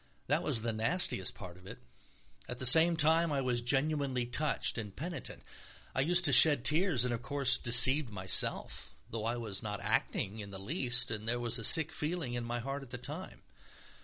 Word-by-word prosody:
That - - -2
was 110 - -3
the 115 -1 -4
nastiest 110 - -2
part 90 -2 -13
of 95 0 -18
it. - - -10 0.7
At 125 - -8
the 130 - -6
same 160 +6 +7
time 160 +1 0
I 140 - -3
was 125 -2 -3
genuinely 135 0 -2
touched 135 0 -4
and 105 -3 -10
penitent, 170 +4 -10 0.5
I 130 - -2
used 175 +4 +2
to 145 - +4
shed 145 0 +6
tears 155 - +1
and, 125 - -4
of 115 - -7
course, 135 -1 0
deceived 130 +3 +6
myself, 95 -3 -1 0.2
though 110 -1 -7
I 120 +2 -4
was 110 -5 -7
not 105 -2 -7
acting 105 +3 -4
in 100 -1 -10
the 100 - -10
least 125 - -2
and 110 0 -7
there 120 0 -2
was 120 0 -3
a - - -9
sick 160 +7 +7
feeling 150 -4 -6
in 120 -1 -6
my 120 +1 -6
heart 135 +4 -7
at 135 - -15
the 125 - -9
time.... 150 +9 -11
125 Hz, 200 wpm, -29 LUFS, 115-150 Hz, 0.7 s, same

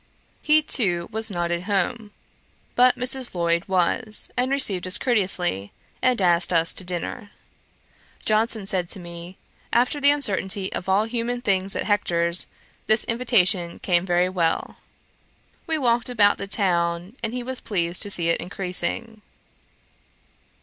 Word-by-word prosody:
He 305 0 +4
too 180 - +1
was 220 0 -2
not 175 -3 -2
at 175 +1 -2
home; 205 +2 -1 0.6
but 250 +1 +4
Mrs. 255 -3 -3
Lloyd 170 -1 0
was, 195 +4 0
and 250 +1 0
received 205 -10 +2
us 185 - +4
courteously, 180 - 0 0.3
and 255 -3 +2
asked 175 -2 +3
us 165 -1 +2
to - - -4
dinner. 180 +3 -5 1.0
Johnson 215 -1 +2
said 185 -3 -1
to - - -3
me, 170 +1 -10 0.3
'After 250 +5 +1
the 285 - +6
uncertainty 200 -8 0
of 190 - -5
all 195 +2 +3
human 235 +2 -3
things 195 -4 0
at - - -1
Hector's, 170 -4 0 0.4
this 220 +1 +4
invitation 200 -7 +2
came 175 -2 +1
very 180 -1 +2
well.' 170 -3 -1 0.9
We 320 -1 0
walked 240 -3 +1
about 210 -4 +3
the 200 - -4
town, 175 0 0
and 225 - -3
he 250 0 -4
was 260 +1 -5
pleased 175 -4 -1
to 205 - +1
see 170 -4 +3
it 170 - +1
increasing. 200 +4 -3
195 Hz, 145 wpm, -23 LUFS, 175-235 Hz, 1.0 s, the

